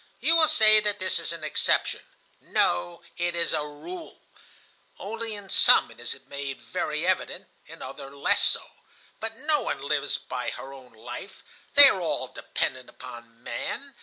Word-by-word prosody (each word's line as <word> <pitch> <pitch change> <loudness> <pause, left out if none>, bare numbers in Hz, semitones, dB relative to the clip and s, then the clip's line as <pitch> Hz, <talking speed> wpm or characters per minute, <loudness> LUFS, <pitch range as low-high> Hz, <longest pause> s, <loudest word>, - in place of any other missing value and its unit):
You 330 - +3
will 320 -1 +6
say 215 -4 +6
that 210 -1 +1
this 185 -2 0
is - - -3
an 165 -2 -6
exception. 155 - 0 0.4
No, 85 0 -1
it 175 0 -1
is 170 0 +2
a 155 - +1
rule. 235 - -9 0.8
Only 225 +1 -6
in 205 -1 -10
some - - +5
it - - -17
is - - -4
made 140 -1 -6
very 150 +7 -3
evident, 185 0 -1 0.2
in - - -11
others 135 - -9
less 140 - +2
so. - - +1 0.6
But 225 0 -5
no 295 +2 +1
one 140 - -4
lives 145 -1 0
by 125 -1 -5
her 135 +2 -8
own 130 -3 -14
life; 110 +1 -10 0.3
they - - +12
are - - +2
all - - -2
dependent 130 -1 -4
upon 120 -2 -12
man. 275 - -5
155 Hz, 165 wpm, -26 LUFS, 130-215 Hz, 0.8 s, they